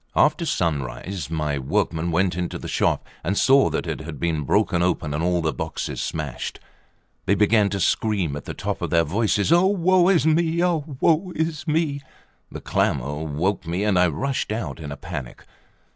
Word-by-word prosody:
After 155 +3 +3
sunrise 75 - -2
my 75 -3 -1
workmen 80 +5 -1
went 90 +2 +1
into 90 -1 -3
the - - -8
shop, - - 0 0.2
and 95 +5 -1
saw 135 0 +5
that - - -2
it - - -3
had 80 -2 -8
been 80 -4 -1
broken 85 +6 +2
open 80 -4 0
and 75 - -1
all 90 -1 +1
the 80 - 0
boxes 80 -1 -4
smashed. - - -4 0.7
They 100 - +4
began 105 0 +3
to 100 0 -3
scream 95 -5 0
at 75 - -7
the - - -6
top - - -3
of - - -2
their 85 -1 +3
voices: 100 - +1
"Ah, 175 +2 +5
woe 185 -1 +3
is 175 -5 +3
me! 165 +1 +2
Ah, 175 -1 +3 0.2
woe 170 +4 +2
is 160 0 -2
me!" 150 -2 0 0.5
The - - -7
clamour 75 +4 -1
woke 85 +5 -1
me, 90 +4 -1
and 100 -4 +2
I 90 - +5
rushed 130 - -2
out 110 -4 -4
in 75 -3 -7
a 70 - -6
panic. 65 -3 -7
90 Hz, 190 wpm, -23 LUFS, -, 0.7 s, saw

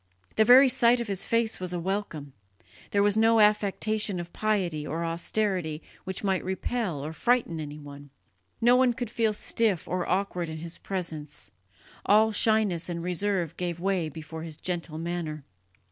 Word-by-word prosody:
The 220 - +5
very 255 +4 +8
sight 240 -1 +4
of 235 - -3
his 195 -1 -2
face 230 -1 0
was 180 -1 -3
a 175 - -2
welcome; 170 -6 -3 0.6
there 200 0 +2
was 205 0 +3
no 225 +1 +4
affectation 210 -1 +2
of 175 0 -7
piety 190 -8 -1
or 165 +2 -2
austerity 170 -1 -1 0.2
which 190 +2 -4
might 190 -2 0
repel 190 - -2
or 155 - -5
frighten 235 -5 +1
anyone; 145 -1 -9 0.5
no 240 +2 +5
one 255 -1 +4
could 240 -2 -5
feel 225 -2 +1
stiff 210 -3 0
or 180 0 -2
awkward 180 -2 -1
in 160 - -6
his 165 +1 -7
presence, 155 - -5 0.5
all 215 +2 +4
shyness 210 -6 +2
and 170 -1 -4
reserve 180 -2 -1
gave 175 -2 -3
way 185 -3 0
before 160 +1 -8
his 160 -2 -7
gentle 170 -3 -3
manner. 165 -3 -4
185 Hz, 160 wpm, -27 LUFS, 165-215 Hz, 0.6 s, very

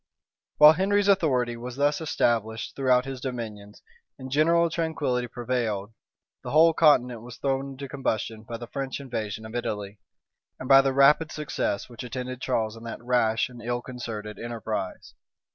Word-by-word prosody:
While 150 +1 +9
Henry's 200 +4 +1
authority 130 -12 +2
was 120 +1 -7
thus 145 +3 +1
established 115 -7 -1
throughout 125 -2 +3
his 135 -2 -6
dominions, 110 -6 -6 0.3
and 130 0 -9
general 165 +4 +4
tranquillity 145 -7 -1
prevailed, 115 -4 -3 0.5
the - - -7
whole 160 +2 +5
continent 125 -8 +3
was 120 0 -10
thrown 135 0 -2
into 140 +1 -7
combustion 115 -5 -3
by 115 +1 -7
the 120 - -7
French 135 +2 -4
invasion 110 -5 -5
of 110 - -9
Italy, 105 -4 -4 0.6
and 130 - -6
by 135 0 +8
the 135 0 +1
rapid 140 +4 +4
success 150 -9 -2
which 120 -2 -10
attended 125 +1 -5
Charles 115 -4 -1
in 115 - -12
that 115 - -6
rash 120 -2 +2
and 125 -2 -12
ill 120 +1 -3
concerted 110 -4 -7
enterprise. 110 -5 -5
125 Hz, 160 wpm, -26 LUFS, 115-140 Hz, 0.6 s, While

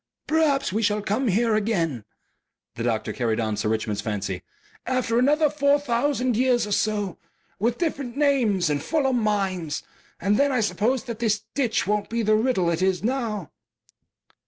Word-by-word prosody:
"Perhaps 295 -7 +1
we 220 - 0
shall 210 -1 +1
come 220 +6 0
here 225 +3 +2
again," 170 - 0 0.7
the - - -7
doctor 115 -2 -1
carried 115 -4 -1
on 110 -2 -1
Sir 105 +1 -1
Richmond's 110 -1 -1
fancy; 100 -4 -3 0.5
"after 245 -2 +1
another 300 +4 +4
four 285 -1 +2
thousand 255 -1 0
years 245 0 +2
or 210 - -6
so, 205 -3 0 0.4
with 230 +4 +1
different 275 -7 -3
names 245 - +2
and 145 -1 0
fuller 275 - 0
minds. 195 -9 -1 0.4
And 205 +1 +2
then 280 0 +3
I 255 - +1
suppose 220 +4 0
that 235 -4 -6
this 215 -3 0
ditch 245 -5 0
won't 210 +1 -1
be 230 0 -1
the 215 0 +3
riddle 215 -6 +2
it 170 +1 -1
is 190 0 +1
now." 225 - -2
215 Hz, 165 wpm, -24 LUFS, 185-255 Hz, 0.7 s, another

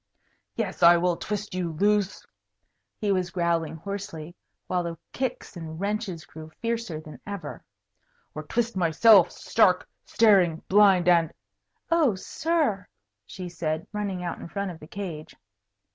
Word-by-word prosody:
"Yes, - - -3
I 170 0 +8
will 175 0 +1
twist 210 +2 -4
you 175 -3 -2
loose," 205 +3 +1 0.7
he 205 -2 0
was 185 -2 0
growling 170 -2 0
hoarsely, 175 -2 -6 0.3
while 180 - 0
the 170 -1 -5 0.2
kicks 255 -5 -4
and 160 -2 -7
wrenches 200 -5 -3
grew 155 +2 -11
fiercer 230 -8 -2
than 155 -1 -12
ever, 200 -1 -6 0.7
"or 155 - -5
twist 230 +8 -2
myself 185 +2 +6
stark, 185 -5 +2 0.2
staring 190 -7 +3
blind 195 -3 +5
and 170 -3 +4 0.3
" 100 - -43
"Oh, 310 - +3
sir!" 275 - -1 0.4
she 185 -1 -7
said, 160 -2 -3
running 200 -3 -3
out 175 - -4
in - - -8
front 200 0 -3
of 165 - -11
the 150 - -12
cage. 170 -5 -7
185 Hz, 145 wpm, -26 LUFS, 165-210 Hz, 0.7 s, I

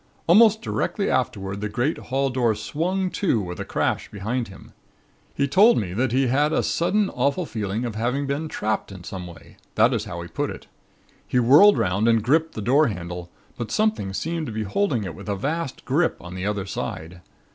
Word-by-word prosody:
Almost 220 +5 +5
directly 200 - -1
afterward 100 -5 -1
the 105 - -2
great 120 +8 -1
hall 135 +1 -1
door 120 -4 +1
swung 180 - -2
to 185 - +1
with 90 -3 -5
a - - -4
crash - - -1
behind 115 +5 -3
him. 95 - -14 0.6
He 140 - +1
told 205 - +5
me 90 -5 -2
that 120 +4 0
he 135 +2 +2
had 145 +5 +2
a - - +1
sudden 200 +4 +1
awful 140 +7 0
feeling 110 -2 -3
of 115 - -3
having 125 +6 -1
been 140 +3 -2
trapped 110 -8 -2
in 90 -2 -10
some 90 0 -6
way 85 - -14 0.2
that - - +4
is - - -1
how - - -6
he - - -8
put - - -2
it. - - -8 0.6
He - - 0
whirled 145 - +7
'round 95 +5 +1
and 115 -2 +3
gripped 160 +6 +2
the 110 - -4
door 140 +7 +4
handle, 90 -4 -5 0.3
but 120 -3 -3
something 215 - 0
seemed 160 +9 -3
to - - -5
be 110 0 -3
holding 120 - 0
it 95 -4 -5
with 100 +6 -9
a 100 - 0
vast 145 - -3
grip 155 +6 +1
on 90 +1 -9
the 95 +2 -3
other 105 -2 -2
side. 85 -2 -6
120 Hz, 205 wpm, -24 LUFS, 100-155 Hz, 0.6 s, whirled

